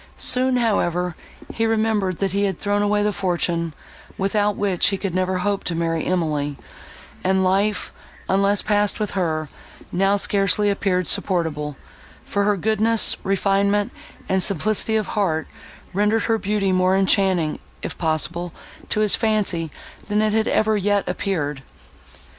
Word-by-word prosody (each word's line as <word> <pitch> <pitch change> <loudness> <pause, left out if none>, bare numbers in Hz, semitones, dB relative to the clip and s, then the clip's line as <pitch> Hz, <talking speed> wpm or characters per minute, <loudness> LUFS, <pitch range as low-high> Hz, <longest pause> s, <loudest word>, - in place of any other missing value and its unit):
Soon, 255 0 +2
however, 180 -7 0 0.4
he 225 0 0
remembered, 215 -5 +1
that 195 -2 -1
he 200 +2 +1
had 190 -4 -2
thrown 205 0 0
away 205 0 +2
the 210 0 +1
fortune, 170 -3 -1 0.5
without 205 +1 +1
which 195 -4 +1
he 195 - 0
could 190 -2 -4
never 185 0 0
hope 200 +2 -1
to 170 - -2
marry 165 -1 -1
Emily; 150 -5 -1 0.7
and 190 0 +2
life, 195 +2 +1 0.3
unless 200 +1 +2
passed 205 0 +1
with 210 -2 -2
her, 160 -5 -1 0.4
now 195 +2 +2
scarcely 200 +1 +2
appeared 185 -3 0
supportable; 150 -6 0 0.5
for 200 0 0
her 205 -1 +2
goodness, 220 +3 +2
refinement, 200 +2 +1 0.4
and 190 0 +1
simplicity 210 +4 0
of 215 -1 +1
heart, 165 -7 0 0.5
rendered 210 +3 +2
her 225 -1 +1
beauty 200 -1 0
more 185 +1 +3
enchanting, 190 -4 +2 0.2
if - - -4
possible, 165 +2 -1 0.4
to 215 - 0
his 210 -2 +5
fancy, 205 -7 0 0.4
than 210 0 +1
it 215 -1 +1
had 220 0 +1
ever 220 0 +2
yet 205 0 +1
appeared. 150 -8 -2
195 Hz, 145 wpm, -22 LUFS, 180-210 Hz, 0.7 s, his